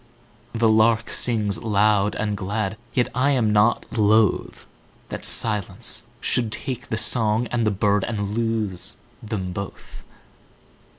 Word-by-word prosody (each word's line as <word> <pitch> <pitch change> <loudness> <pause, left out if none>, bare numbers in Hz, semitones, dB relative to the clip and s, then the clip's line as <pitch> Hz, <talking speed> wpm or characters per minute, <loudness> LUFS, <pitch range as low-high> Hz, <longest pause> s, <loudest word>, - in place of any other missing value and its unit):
The 115 0 +2
lark 110 +1 +3
sings 105 -5 0
loud 105 -1 +2
and 105 -1 -2
glad, 100 +1 -3 0.2
Yet 125 -1 0
I 130 +3 +1
am 110 -5 +1
not 105 +3 +2
lothThat 110 -1 -1
silence 105 +1 +2
should 115 -4 0
take 130 +2 -5
the 110 - -2
song 110 0 +2
and 115 -2 0
the - - +2
birdAnd 105 +1 -1
lose 115 -5 -2 0.3
them 100 -4 -4
both. 100 +1 -8
110 Hz, 120 wpm, -22 LUFS, 105-115 Hz, 0.3 s, lark